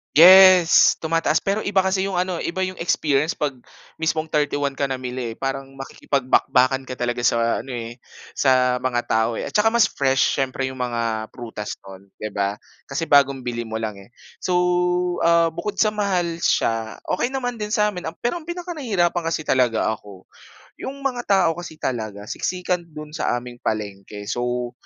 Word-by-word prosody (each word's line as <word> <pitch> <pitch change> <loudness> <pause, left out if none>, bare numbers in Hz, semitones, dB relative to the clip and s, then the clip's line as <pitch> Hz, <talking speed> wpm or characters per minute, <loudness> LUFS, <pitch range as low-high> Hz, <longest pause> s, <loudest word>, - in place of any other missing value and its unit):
Yes. 185 0 +8
Tumataas, 165 0 +1
pero 200 +2 -1
iba 200 -1 +2
kasi 190 0 +1
yung 195 -2 -1
ano 180 0 -1
iba 170 +3 -3
yung 185 - -6
experience 155 -3 +1
'pag 150 -8 -2 0.4
mismong 160 0 -1
31 145 -2 0
ka 140 - -3
namili 130 -3 -3
eh, - - -9
parang 135 0 -3
makikipagbakbakan 135 -1 +1
ka 130 -1 -8
talaga 120 0 -2
sa 115 -1 +1
ano 135 - -9
eh, 120 -1 -5 0.4
sa 130 -2 +3
mga 120 -2 -1
tao 110 +1 +1
eh. - - -4
At - - -10
saka 220 +1 +4
mas 235 -1 +4
fresh 135 -1 +1
siyempre 135 -1 -1
'yong 130 - -6
mga 115 -2 -2
prutas 115 -4 -7
no'n, 95 0 -13
'di 110 - -3
ba, 100 0 -2 0.3
kasi 160 +4 -2
bagong 140 -2 +4
bili 120 -1 -4
mo 110 -1 -5
lang 110 -2 -3
eh. 100 - -22 0.3
So, 185 - -1 0.7
ah, 170 0 +4
bukod 195 +5 -5
sa 215 -1 +2
mahal 175 -5 -1
siya, 115 -1 0
okey 240 +7 0
naman 245 -2 -2
din 210 -2 -5
sa'min, 210 -4 0
um, 165 - -24
pero 240 - -1
ang 345 - -6
pinaka-nahirapan 270 - -1
kasi 160 -2 -3
talaga 115 -4 +2
ako, 95 -2 -15 0.5
yung 275 +1 -7
mga 250 -3 -1
tao 190 -4 +4
kasi 175 -2 -8
talaga, 110 -7 -4
siksikan 180 - -2
do'n 155 -3 -11
sa 155 -5 -1
aming 120 0 -8
palengke. 105 -1 -4
So, 120 +2 -2
140 Hz, 175 wpm, -22 LUFS, 120-180 Hz, 0.7 s, Yes